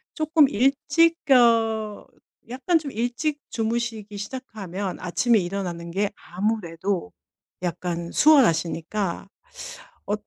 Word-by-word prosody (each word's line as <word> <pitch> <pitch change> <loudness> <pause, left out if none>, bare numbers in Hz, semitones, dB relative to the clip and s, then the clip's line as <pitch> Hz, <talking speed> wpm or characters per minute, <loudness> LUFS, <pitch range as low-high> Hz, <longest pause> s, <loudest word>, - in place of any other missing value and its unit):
쪼끔 310 -2 +4
일찍 285 +7 +2
어 225 -4 +3 0.4
약간 270 +8 +1
좀 295 -3 -7
일찍 245 +6 -2
주무시기 225 -2 -3
시작하면 205 -5 -6
아침에 220 +6 +2
일어나는 175 -2 -4
게 200 +3 0
아무래도 185 - -3 0.5
약간 170 -1 -3
수월하시니까 195 - +2 0.8
어 205 - 0
215 Hz, 230 characters per minute, -24 LUFS, 185-255 Hz, 0.8 s, 쪼끔